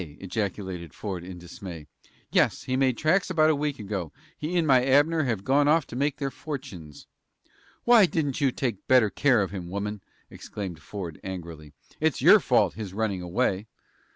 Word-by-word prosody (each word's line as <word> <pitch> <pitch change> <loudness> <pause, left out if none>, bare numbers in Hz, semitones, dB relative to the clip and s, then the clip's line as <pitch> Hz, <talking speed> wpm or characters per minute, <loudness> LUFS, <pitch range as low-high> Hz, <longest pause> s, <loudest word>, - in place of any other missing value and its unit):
ejaculated 95 -3 -4
Ford, 95 -5 -5
in 90 0 -8
dismay. 85 -2 -9 0.5
"Yes; - - +2
he 130 - -2
made 130 -2 +2
tracks 175 +5 +2
about 160 -3 +4
a - - +1
week 145 -1 -2
ago. 100 -6 -4 0.2
He 165 +4 -3
and 170 - +2
my 130 -4 +5
Abner 145 +4 +3
have 110 -6 -2
gone 140 +4 +3
off 155 0 +3
to - - -10
make 140 +2 0
their 140 -2 -3
fortunes." 130 - -8 0.8
"Why 235 -5 +6
didn't 150 -4 -2
you 135 -2 +3
take 120 -6 -3
better 125 -5 +5
care 130 -7 +3
of 95 - -5
him, 90 -3 -6
woman?" 100 +2 -4 0.3
exclaimed 95 -6 -7
Ford, 85 +1 -7
angrily. 85 -6 -8 0.3
"It's - - +1
your - - +7
fault, - - +2
his 100 -4 -7
running 105 -4 -1
away!" 95 +2 -1
110 Hz, 175 wpm, -26 LUFS, 95-140 Hz, 0.8 s, your